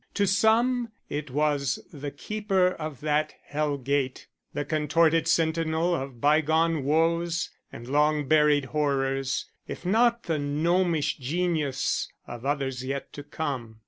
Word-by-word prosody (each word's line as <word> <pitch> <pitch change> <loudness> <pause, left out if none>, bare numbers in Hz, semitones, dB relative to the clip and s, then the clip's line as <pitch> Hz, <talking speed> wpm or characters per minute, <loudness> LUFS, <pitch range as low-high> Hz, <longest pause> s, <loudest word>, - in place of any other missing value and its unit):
To 200 - +2
some 230 +5 +3 0.2
it 145 0 -3
was 145 -1 +1 0.2
the 145 -1 -5
keeper 190 +4 0
of 155 -7 -6
that 150 0 0
hell 145 -1 -1
gate; 135 0 -1 0.3
the 145 - -3
contorted 160 +2 +2
sentinel 165 +1 +1
of 135 -6 -4
bygone 160 +2 +2
woes 165 +3 +1 0.2
and 120 - -9
long 150 +1 +2
buried 150 -1 +4
horrors, 135 -2 0 0.2
if - - -7
not 235 +4 +3
the 160 -3 -1
gnomish 160 +3 +1
genius 150 -1 -1
of 120 +2 -7
others 135 -3 -1
yet 135 +1 -4
to 145 - -7
come. 135 -7 -5
150 Hz, 130 wpm, -27 LUFS, 140-165 Hz, 0.3 s, buried